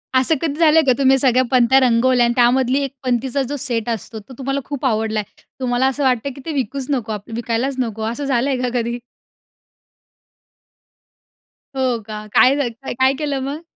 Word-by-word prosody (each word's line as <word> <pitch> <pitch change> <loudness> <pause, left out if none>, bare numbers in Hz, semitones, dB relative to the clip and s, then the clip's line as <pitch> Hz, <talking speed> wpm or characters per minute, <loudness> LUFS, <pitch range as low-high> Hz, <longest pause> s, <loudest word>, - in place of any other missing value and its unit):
असं 260 +5 +3
कधी 310 -2 -2
झालं 320 -1 +5
आहे 315 - +2
का 260 - +4
तुम्ही 270 -1 +4
सगळ्या 255 -1 +3
पंत्या 255 +1 +5
रंगवल्या 250 0 +3
आणि 235 - +1
त्यामधली 255 +2 +3
एक 275 - -3
पंतीचा 255 +2 0
जो 290 - -2
सेट 240 -4 -2
असतो, 225 0 -4
तो 215 +5 -14
तुम्हाला 275 +1 -2
खूप 285 -1 -5
आवडला 220 -2 0
आहे. 205 - -9 0.2
तुम्हाला 250 0 +1
असं 270 +2 -1
वाटतं 255 0 +1
की 275 - -11
ते 325 - -3
विकूच 270 0 -3
नको 245 -6 -2
आपलं 210 +2 -8
विकायलाच 240 +3 -2
नको, 225 -3 -3
असं 280 +5 -4
झालं 265 0 +1
आहे 265 - 0
का 250 - 0
कधी? 235 +1 -3 2.8
हो 255 -3 0
का? 215 -1 -7
काय 260 +2 +5
झाल, 285 -4 0 0.2
काय 260 +2 +1
केलं 290 -3 -2
मग? 295 +3 -6
255 Hz, 190 wpm, -19 LUFS, 235-275 Hz, 2.8 s, झालं